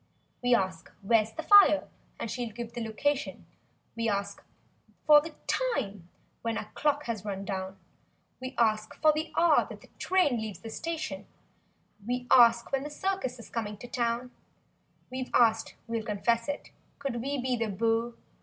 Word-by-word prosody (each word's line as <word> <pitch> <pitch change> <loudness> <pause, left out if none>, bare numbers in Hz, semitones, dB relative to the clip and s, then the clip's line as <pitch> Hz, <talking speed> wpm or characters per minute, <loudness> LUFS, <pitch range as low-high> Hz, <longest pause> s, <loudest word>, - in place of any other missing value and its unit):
We 245 -1 +4
ask—"Wliere's 210 +2 0
the 320 - -5
fire" 400 -5 +7 0.3
and 225 - -4
she'll 240 -3 -3
give 235 +1 -7
the 240 - -4
location; 285 +6 -2 0.5
We 230 0 0
ask 200 -1 -3 0.6
for 300 -1 +8
the 315 0 -9
"time" 210 - -2 0.3
when 230 -1 -2
our 215 - -6
clock 295 -1 +1
has 230 -6 -4
run 200 -1 -4
down; 190 0 -4 0.6
We 255 +1 -6
ask 215 -2 +1
for 310 0 +4
the 310 +2 -3
hour 335 -3 +4
that - - -10
the - - -17
train 365 -10 +2
leaves 220 -3 -5
the 225 - -8
station; 330 +6 -4 0.8
191 - - -15
We 245 0 -2
ask 235 -1 +6
when 270 - +1
the 295 - -5
circus 380 -3 -2
is 230 - -12
coming 210 -3 -3
to 245 - -9
town; 240 0 -1 0.8
We've 255 0 -4
asked, 225 -2 +3
we'll 230 -1 -2
confess 230 +2 0
it, 285 - -5 0.3
could 270 -5 -3
we 280 +2 -2
be 255 0 0
the 230 -1 -1
beau— 225 +3 0
235 Hz, 165 wpm, -29 LUFS, 220-280 Hz, 0.8 s, for